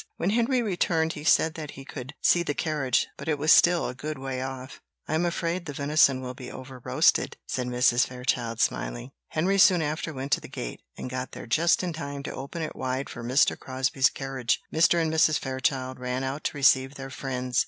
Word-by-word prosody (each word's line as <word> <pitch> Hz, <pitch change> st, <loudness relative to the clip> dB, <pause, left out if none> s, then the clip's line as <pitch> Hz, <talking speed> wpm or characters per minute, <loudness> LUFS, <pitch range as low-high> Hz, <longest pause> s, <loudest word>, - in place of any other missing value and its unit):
When 180 Hz, -, 0 dB
Henry 240 Hz, +2 st, +2 dB
returned 170 Hz, -5 st, 0 dB
he 150 Hz, -, -8 dB
said 160 Hz, 0 st, +4 dB
that 155 Hz, -3 st, -7 dB
he 135 Hz, -, -9 dB
could 135 Hz, +1 st, -8 dB
see 175 Hz, -, +5 dB
the 145 Hz, -4 st, -2 dB
carriage, 150 Hz, -6 st, 0 dB
but -, -, -8 dB
it 155 Hz, -2 st, +1 dB
was 150 Hz, +2 st, +3 dB
still 175 Hz, 0 st, +5 dB
a -, -, -4 dB
good 150 Hz, +3 st, -5 dB
way 130 Hz, -1 st, -4 dB
off. 130 Hz, 0 st, -7 dB, 0.3 s
"I -, -, -2 dB
am 160 Hz, +2 st, +2 dB
afraid 170 Hz, +1 st, -2 dB
the 145 Hz, -, -5 dB
venison 140 Hz, -2 st, +3 dB
will 125 Hz, -1 st, -5 dB
be 125 Hz, -1 st, -9 dB
over 130 Hz, -1 st, -10 dB
roasted," -, -, +2 dB
said 125 Hz, -1 st, -2 dB
Mrs. 125 Hz, 0 st, +3 dB
Fairchild, 125 Hz, -2 st, -2 dB
smiling. -, -, -1 dB, 0.2 s
Henry 190 Hz, +5 st, +1 dB
soon 180 Hz, -4 st, +6 dB
after 155 Hz, +2 st, -3 dB
went 135 Hz, -1 st, -6 dB
to -, -, +3 dB
the -, -, -9 dB
gate, -, -, -6 dB, 0.2 s
and -, -, -5 dB
got 130 Hz, 0 st, -5 dB
there -, -, -8 dB
just 165 Hz, +10 st, +2 dB
in 175 Hz, -2 st, -2 dB
time 140 Hz, -3 st, -6 dB
to -, -, -5 dB
open 140 Hz, +5 st, -5 dB
it 155 Hz, -, -5 dB
wide 130 Hz, +1 st, -3 dB
for 120 Hz, -, -8 dB
Mr. 130 Hz, +4 st, +3 dB
Crosbie's 130 Hz, 0 st, +1 dB
carriage. 135 Hz, -3 st, -2 dB
Mr. 165 Hz, +2 st, +4 dB
and 160 Hz, -1 st, 0 dB
Mrs. 155 Hz, -1 st, +4 dB
Fairchild 130 Hz, -1 st, -2 dB
ran 125 Hz, +1 st, -2 dB
out 135 Hz, +3 st, -4 dB
to -, -, -2 dB
receive 135 Hz, 0 st, +4 dB
their 135 Hz, 0 st, -8 dB
friends. 125 Hz, -1 st, -2 dB
135 Hz, 215 wpm, -26 LUFS, 130-160 Hz, 0.3 s, soon